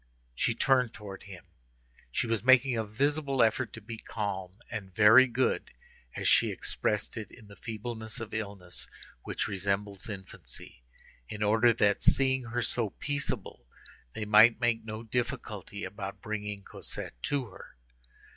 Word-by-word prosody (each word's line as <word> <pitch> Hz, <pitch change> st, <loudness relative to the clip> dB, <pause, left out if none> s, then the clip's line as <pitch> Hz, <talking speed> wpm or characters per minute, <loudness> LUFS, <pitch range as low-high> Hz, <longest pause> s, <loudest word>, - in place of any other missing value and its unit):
She -, -, 0 dB
turned 130 Hz, -3 st, +3 dB
towards 100 Hz, -3 st, -9 dB
him; 95 Hz, -3 st, -11 dB, 0.7 s
she -, -, 0 dB
was 115 Hz, -3 st, 0 dB
making 130 Hz, 0 st, +6 dB
a 110 Hz, -, 0 dB
visible 140 Hz, +4 st, +1 dB
effort 115 Hz, +2 st, +1 dB
to 115 Hz, -, -8 dB
be 110 Hz, +2 st, -7 dB
calm 95 Hz, -5 st, -4 dB, 0.2 s
and 100 Hz, -3 st, -5 dB
"very 110 Hz, +7 st, +8 dB
good," 130 Hz, +1 st, 0 dB, 0.5 s
as -, -, -1 dB
she -, -, +5 dB
expressed 105 Hz, +2 st, -2 dB
it 110 Hz, -3 st, -5 dB
in 115 Hz, -, -15 dB
the 100 Hz, -, -13 dB
feebleness 110 Hz, +1 st, -5 dB
of 115 Hz, -1 st, -7 dB
illness 100 Hz, -5 st, -4 dB, 0.3 s
which -, -, -2 dB
resembles 100 Hz, +1 st, -2 dB
infancy, 95 Hz, -, -9 dB, 0.5 s
in 105 Hz, 0 st, -3 dB
order 110 Hz, +3 st, +5 dB
that, 105 Hz, -1 st, +2 dB
seeing 130 Hz, -2 st, +3 dB
her 120 Hz, +1 st, -2 dB
so 115 Hz, -2 st, 0 dB
peaceable, 140 Hz, -, -4 dB, 0.5 s
they 110 Hz, -, -4 dB
might 110 Hz, +2 st, +7 dB
make 120 Hz, -2 st, +1 dB
no 110 Hz, 0 st, -6 dB
difficulty 115 Hz, -4 st, -3 dB
about 100 Hz, -1 st, -6 dB
bringing 105 Hz, -1 st, -4 dB
Cosette -, -, -7 dB
to 140 Hz, -, 0 dB
her. 100 Hz, -, -13 dB
110 Hz, 145 wpm, -30 LUFS, 100-120 Hz, 0.7 s, very